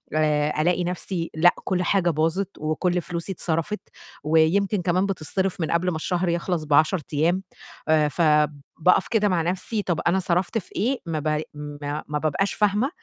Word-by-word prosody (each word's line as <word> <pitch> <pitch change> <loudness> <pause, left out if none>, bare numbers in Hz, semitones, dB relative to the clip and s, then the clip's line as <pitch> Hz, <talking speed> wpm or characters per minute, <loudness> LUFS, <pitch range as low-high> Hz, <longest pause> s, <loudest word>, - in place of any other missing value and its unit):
آآ 150 -1 +1
ألاقي 180 +2 +1
نَفْسي 175 -1 -3
لأ، 175 +3 +5
كل 185 -1 0
حاجة 180 -1 +2
باظت 165 +5 0
وكل 175 +4 0
فلوسي 170 +2 -4
اتصرفت، 170 +3 -2 0.4
ويمكن 165 +6 +2
كمان 180 +2 +1
بتتصرف 190 0 -2
من 160 - -1
قبل 170 +2 +1
ما 175 - -2
الشهر 175 +3 -1
يخلّص 170 -1 -1
ب10 155 +4 +3
أيام. 170 +6 +1 0.4
آآ 155 -1 +4
فباقف 150 +1 +2
كده 210 -3 +2
مع 180 -3 +1
نَفْسي، 185 +6 -2
طَب 175 -5 -1
أنا 180 +3 +3
صرفت 180 +4 0
في 195 - -6
إيه؟ 255 +5 0
ما 165 -2 -2
ب 150 0 0
ما 145 0 -5
ما 150 0 -2
بابقاش 160 +6 0
فاهمة 210 +5 +1
170 Hz, 165 wpm, -24 LUFS, 155-185 Hz, 0.4 s, لأ